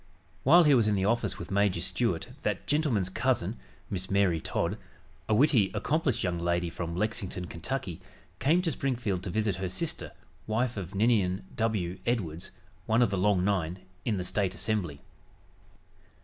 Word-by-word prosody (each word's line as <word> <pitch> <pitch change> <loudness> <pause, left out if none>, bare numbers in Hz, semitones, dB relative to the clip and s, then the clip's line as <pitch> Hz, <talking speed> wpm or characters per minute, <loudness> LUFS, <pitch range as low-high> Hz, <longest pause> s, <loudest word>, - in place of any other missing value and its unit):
While 170 +6 +7
he 150 -2 +5
was 115 -5 +4
in 105 - +2
the 95 -1 +1
office 115 -1 +1
with - - -7
Major 100 -1 +2
Stuart - - -1
that - - -2
gentleman's 145 - +1
cousin, 110 -1 0 0.3
Miss 95 -1 -4
Mary 95 -4 +3
Todd, - - -1 0.5
a 110 - +4
witty, 120 -6 +4
accomplished 155 -5 0
young 90 -2 -1
lady 85 0 0
from 85 -1 -4
Lexington, 95 -2 -2
Kentucky, 90 0 -4 0.4
came 170 +6 +3
to 165 - +1
Springfield 120 -10 -1
to 95 - -5
visit 105 -1 0
her 95 -1 -2
sister, 165 - -3 0.4
wife 120 +3 0
of 95 -1 -6
Ninian 100 -3 +2
W. 105 -6 -1
Edwards, 90 -9 -1 0.4
one 115 +2 +4
of 115 - +1
the 100 - 0
"Long 95 -2 +3
Nine" 90 -4 0 0.3
in 110 -4 0
the 90 - -2
State 95 0 0
Assembly. 90 -6 -2
100 Hz, 165 wpm, -29 LUFS, 90-120 Hz, 0.5 s, While